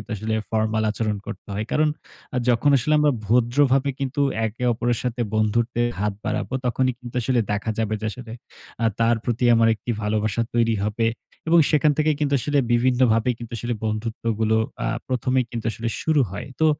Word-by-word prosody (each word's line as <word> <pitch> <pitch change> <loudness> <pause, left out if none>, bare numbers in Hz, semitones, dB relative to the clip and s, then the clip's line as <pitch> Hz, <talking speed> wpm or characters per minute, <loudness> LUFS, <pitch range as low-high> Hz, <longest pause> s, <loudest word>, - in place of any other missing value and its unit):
আসলে 110 +2 -3 0.2
ফর্মাল 110 0 0
আচরণ 110 -2 -2
করতে - - -8
হয়। 105 +2 -2
কারণ 155 0 +3 0.5
আ - - +1
যখন 120 +5 +3
আসলে 145 +5 +1
আমরা 150 -1 +4
ভদ্রভাবে 130 +5 +3
কিন্তু 135 +1 -1 0.3
একে 115 +3 -7
অপরের 120 0 0
সাথে 125 -1 -2
বন্ধুত্বের 120 +2 +1
হাত 105 0 0
বাড়াবো 110 +4 -2
তখনই 130 +1 +1
কিন্তু 120 0 -10
আসলে 125 +2 +1
দেখা 105 +2 -1
যাবে 110 -1 0
যে, - - -3
আসলে 120 0 -9 0.5
আ - - +4
তার 115 +1 +4
প্রতি 120 +1 -1
আমার 115 0 +4
একটি 110 - -12
ভালবাসা 110 +1 0
তৈরি 115 -1 +2
হবে। 110 +2 0 0.4
এবং 170 +1 +6
সেখান 150 -1 +4
থেকে 155 0 +3
কিন্তু 145 -1 0
আসলে 145 +3 +1
বিভিন্নভাবে 120 -1 +3
কিন্তু 120 0 -9
আসলে 120 +2 -2
বন্ধুত্বগুলো 110 0 -1 0.3
আ - - 0 0.2
১ম 125 -1 -1
এই 125 - 0
কিন্তু 115 -2 -5
আসলে 115 +1 -3
শুরু 155 -3 +3
হয়। 105 +6 -6
তো 160 - +4
120 Hz, 180 wpm, -23 LUFS, 110-130 Hz, 0.5 s, এবং